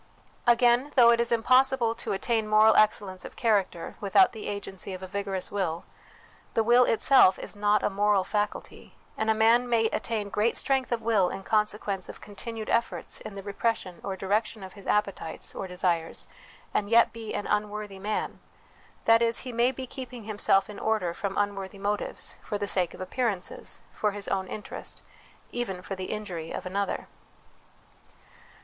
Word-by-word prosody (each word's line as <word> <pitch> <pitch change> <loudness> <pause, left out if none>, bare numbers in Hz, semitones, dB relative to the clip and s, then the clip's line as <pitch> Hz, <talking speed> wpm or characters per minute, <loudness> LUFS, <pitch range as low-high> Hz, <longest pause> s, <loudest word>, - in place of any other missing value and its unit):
Again, 240 +3 +4
though 235 -3 +8
it 235 - +3
is 235 - +1
impossible 255 0 +3
to 230 - -4
attain 220 +2 0
moral 215 +1 +6
excellence 200 -3 +2
of - - -9
character 200 -7 0
without 210 - +5
the 220 - -7
agency 195 -2 -5
of 185 - -9
a - - -5
vigorous 195 -1 -3
will, 180 -4 -2 0.7
the 225 - +3
will 240 +2 +6
itself 230 -4 +5
is - - -7
not 205 +1 +2
a - - +2
moral 205 0 +2
faculty, 210 +2 -4 0.2
and 220 - -1
a 220 - +4
man 230 +3 +4
may 230 -2 +3
attain 215 -2 -2
great 215 +3 +1
strength 265 -2 +1
of 230 -2 -1
will 210 -5 +3
in 195 - -6
consequence 210 -2 0
of - - -9
continued 220 +2 -7
efforts 230 0 -1
in 215 - -8
the 195 - -7
repression 200 -3 -2
or 195 - -3
direction 205 +2 -1
of 185 - -9
his 200 -2 -12
appetites 200 -6 -1
or 190 - -5
desires, 175 -2 -1 0.5
and 205 - 0
yet 230 +1 +5
be 225 -2 -6
an 205 - -3
unworthy 210 -1 -2
man; 210 +2 -3 0.7
that 225 0 +6
is, 230 0 +2
he 255 -2 -7
may 240 +2 +3
be 265 0 -6
keeping 250 -2 -8
himself 205 -2 +2
in 210 -1 -9
order 215 -6 0
from 195 +2 -4
unworthy 200 -1 -2
motives, 205 +1 -3
for 205 - -3
the 205 - -2
sake 185 -3 0
of - - -10
appearances, 200 -1 -3
for 210 -1 0
his 205 -1 -4
own 190 -1 -1
interest, 210 - -6 0.5
even 230 -7 -3
for 195 - -5
the 185 -1 -4
injury 180 -7 -5
of - - -5
another. 200 +2 -2
210 Hz, 175 wpm, -27 LUFS, 195-230 Hz, 0.7 s, though